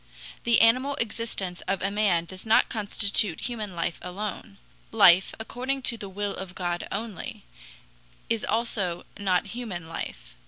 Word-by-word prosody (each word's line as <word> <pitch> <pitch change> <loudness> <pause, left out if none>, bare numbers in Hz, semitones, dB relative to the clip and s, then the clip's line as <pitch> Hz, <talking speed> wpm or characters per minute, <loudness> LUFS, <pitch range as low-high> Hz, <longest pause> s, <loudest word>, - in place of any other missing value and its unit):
The 235 -1 +5
animal 255 +5 +4
existence 220 -7 -2
of 195 -2 0
a 195 - 0
man 200 -5 +2
does 185 +2 -9
not 220 0 +4
constitute 205 -3 +2
human 215 -6 -4
life 170 0 -2
alone. 180 - -6 0.3
Life, 180 +2 +6
according 255 +4 -2
to 240 - +1
the 205 -3 -7
will 205 +1 -3
of 185 -1 -7
God 175 -1 -2
only, 210 -2 -5 0.8
is 230 -2 0
also 205 -6 -1
not 190 -3 +1
human 210 -9 -5
life. 165 - -7
205 Hz, 145 wpm, -27 LUFS, 180-230 Hz, 0.8 s, Life